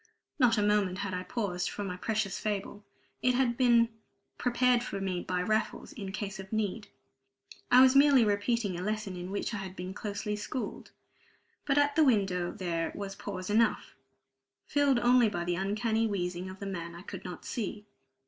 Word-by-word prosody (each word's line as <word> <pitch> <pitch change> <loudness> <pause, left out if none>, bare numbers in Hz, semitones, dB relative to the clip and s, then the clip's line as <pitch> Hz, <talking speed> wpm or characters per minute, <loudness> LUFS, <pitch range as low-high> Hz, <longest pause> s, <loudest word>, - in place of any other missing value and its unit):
Not 240 -4 +5
a 210 - +2
moment 205 -3 +2
had 190 - -4
I 180 - -2
paused 180 -2 -2
for 205 - -5
my 185 -2 -4
precious 215 0 -2
fable. 205 0 -3 0.4
It 250 -1 +3
had 260 -1 +3
all - - -1
been 235 -2 +4 0.5
prepared 245 0 +3
for 220 -5 -4
me 185 -2 -2
by 180 0 -1
Raffles, 215 +2 -1
in 195 -5 -6
case 200 -1 -5
of 190 0 -9
need. 215 0 -2 0.8
I 250 +1 +8
was 260 0 +6
merely 275 -4 +6
repeating 205 -2 0
a - - -4
lesson 210 -1 -3
in 180 +1 -6
which 200 +4 -3
I - - -2
had 190 -1 -6
been 180 +1 -6
closely 210 +1 -3
schooled. 220 +4 -5 0.8
But 280 0 +2
at 285 0 +3
the 320 - +5
window 195 -9 +2
there 165 -3 -2
was 200 -1 -5
pause 190 -2 -6
enough, 225 +1 +2 0.7
filled 285 -2 +3
only 240 -1 +5
by 175 -4 -3
the 175 0 -1
uncanny 220 +4 0
wheezing 180 -2 -3
of 190 - -9
the 200 - -6
man 170 -3 -5
I 175 - -10
could 190 -2 -8
not 180 -2 -8
see. 210 -2 -4
205 Hz, 185 wpm, -30 LUFS, 185-235 Hz, 0.8 s, I